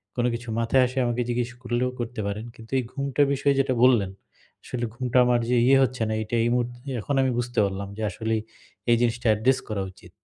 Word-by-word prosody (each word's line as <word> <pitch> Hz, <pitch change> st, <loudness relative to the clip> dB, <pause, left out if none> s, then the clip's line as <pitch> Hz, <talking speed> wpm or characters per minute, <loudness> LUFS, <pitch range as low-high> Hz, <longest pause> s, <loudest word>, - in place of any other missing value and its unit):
কোন 120 Hz, -, 0 dB
কিছু 115 Hz, 0 st, -5 dB
মাথায় 115 Hz, +3 st, +3 dB
আসে 130 Hz, +2 st, -9 dB
আমাকে 120 Hz, +1 st, 0 dB
জিজ্ঞেস 120 Hz, 0 st, -1 dB
করলেও 120 Hz, +1 st, 0 dB
করতে 120 Hz, 0 st, -4 dB
পারেন। 105 Hz, +2 st, -4 dB
কিন্তু 115 Hz, 0 st, -14 dB
এই -, -, -1 dB
ঘুমটার 140 Hz, +1 st, +1 dB
বিষয়ে 140 Hz, 0 st, +2 dB
যেটা 130 Hz, -, 0 dB
বললেন, 115 Hz, -7 st, +4 dB, 0.5 s
আসলে 120 Hz, -1 st, -3 dB
ঘুমটা 125 Hz, 0 st, -1 dB
আমার 120 Hz, -1 st, +3 dB
যে 125 Hz, -, +3 dB
ইয়ে 135 Hz, -, +6 dB
হচ্ছে 130 Hz, -2 st, -2 dB
না -, -, 0 dB
এইটা 110 Hz, +2 st, -3 dB
এই 120 Hz, -, +2 dB
মুহূর্তে 120 Hz, 0 st, -2 dB, 0.2 s
এখন 140 Hz, -, -2 dB
আমি 130 Hz, -1 st, +2 dB
বুঝতে 120 Hz, 0 st, -2 dB
পারলাম 100 Hz, 0 st, -4 dB
যে -, -, -5 dB
আসলেই 110 Hz, +2 st, -1 dB, 0.5 s
এই 115 Hz, -, +5 dB
জিনিসটা 120 Hz, 0 st, 0 dB
অ্যাড্রেস 125 Hz, +5 st, +2 dB
করা 105 Hz, -2 st, -2 dB
উচিত। 90 Hz, -2 st, -17 dB
120 Hz, 210 wpm, -25 LUFS, 115-130 Hz, 0.5 s, ইয়ে